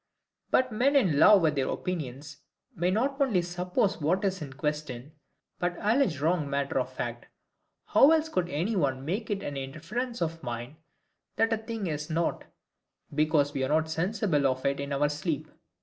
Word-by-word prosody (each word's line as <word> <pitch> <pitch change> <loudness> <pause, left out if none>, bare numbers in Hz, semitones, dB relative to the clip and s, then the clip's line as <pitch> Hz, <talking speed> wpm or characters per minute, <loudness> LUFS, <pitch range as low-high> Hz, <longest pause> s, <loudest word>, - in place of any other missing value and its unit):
But 255 -1 +2
men 255 +6 +2
in 180 - +3
love 205 -1 +7
with 155 -2 +3
their 135 -2 0
opinions 150 -4 -4 0.4
may 175 +2 0
not 270 +8 0
only 215 -11 +3
suppose 180 +2 -1
what 180 +7 +1
is 190 -2 -1
in 140 -3 -6
question, 145 -2 -4 0.5
but 175 0 -1
allege 210 - +2
wrong 155 -1 +1
matter 140 0 0
of - - -3
fact. - - -5 0.6
How 275 - +6
else 320 0 +3
could 185 - -1
any 175 +10 -1
one 135 -6 0
make 200 +8 -2
it 200 -1 -2
an 145 - -4
inference 165 - -4
of 165 -1 -2
mine, 120 +2 -6 0.6
that 225 0 +2
a - - +1
thing 220 -1 -5
is 150 -1 -3
not, 165 +1 -1 0.7
because 150 -1 +2
we 135 -2 -1
are 130 - -1
not 160 +1 +1
sensible 180 -4 +1
of 130 0 -2
it 140 0 +1
in 140 0 -4
our 140 +1 +2
sleep? 150 0 -3
165 Hz, 180 wpm, -28 LUFS, 145-200 Hz, 0.7 s, love